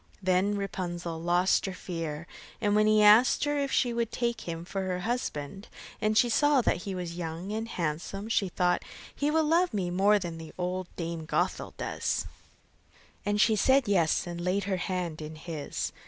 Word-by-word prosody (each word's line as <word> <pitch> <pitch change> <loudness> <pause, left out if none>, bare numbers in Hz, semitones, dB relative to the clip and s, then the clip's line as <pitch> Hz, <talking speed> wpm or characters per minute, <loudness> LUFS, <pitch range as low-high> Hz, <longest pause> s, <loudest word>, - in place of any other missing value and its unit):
Then 185 +3 +2
Rapunzel 175 -4 -4
lost 175 +3 +2
her 190 - -4
fear, 165 -4 -5 0.3
and 205 -2 +1
when 215 0 +4
he 215 0 +5
asked 215 +4 +6
her 290 0 +1
if 280 -1 -1
she 245 -2 +2
would 235 -1 -1
take 235 -6 -2
him 165 0 -5
for 195 +2 -3
her 185 -1 -2
husband, 195 - -3 0.3
and 215 0 +2
she 245 - +5
saw 290 +4 +4
that - - +2
he 190 +2 -5
was 175 -2 -5
young 170 +3 -5
and 220 +1 -3
handsome, 180 +2 -3
she 210 -4 +1
thought: 180 0 +1 0.3
'He 285 - 0
will 320 +1 +3
love 335 -1 +2
me 180 -3 -1
more 200 +4 +4
than 165 -4 -6
old 180 0 -2
Dame 165 -2 -4
Gothel - - -1
does'; - - -2 1.0
and 205 0 +1
she 220 +1 +5
said 265 +3 +3
yes, 180 -5 +2
and 175 -1 -5
laid 185 +3 0
her 190 -1 -1
hand 175 -3 -3
in 155 +1 -7
his. 155 -2 -4
190 Hz, 185 wpm, -29 LUFS, 175-215 Hz, 1.0 s, asked